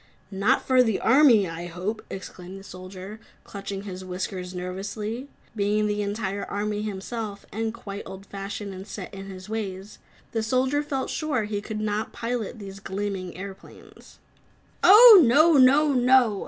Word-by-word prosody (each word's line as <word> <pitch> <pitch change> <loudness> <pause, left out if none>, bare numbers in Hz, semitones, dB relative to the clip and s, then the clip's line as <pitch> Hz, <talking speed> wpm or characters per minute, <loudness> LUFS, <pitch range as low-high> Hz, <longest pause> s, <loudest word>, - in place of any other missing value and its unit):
"Not 195 +6 +1
for 255 -1 +5
the 225 -5 +1
army, 255 -9 +5
I 165 +1 -6
hope," 185 +6 -4
exclaimed 190 0 -8
the - - -13
Soldier, 185 +3 -9 0.2
clutching 200 -1 -7
his 185 -2 -7
whiskers 180 0 -5
nervously. 205 +7 -5 0.3
Being 210 0 +1
the 210 0 -1
entire 200 -1 -3
army 210 0 -3
himself, 210 0 -5
and 225 +1 -2
quite 205 -4 -8
old 190 +1 -10
fashioned 200 +1 -6
and 190 +2 -9
set 195 -1 -8
in 195 0 -8
his 185 -1 -9
ways, 205 -2 -5 0.3
the 225 - -1
Soldier 260 +5 +1
felt 280 -3 -3
sure 295 -8 -1
he 205 -1 -3
never 215 0 -1
could - - -25
pilot 235 -1 -3
these 195 -2 -9
gleaming 195 -2 -4
airplanes. 195 0 -12 0.7
"Oh, 420 +1 +10
No! 305 +7 +5
No! 280 +3 +5
NO!" 250 -4 +4
205 Hz, 155 wpm, -25 LUFS, 195-235 Hz, 0.7 s, Oh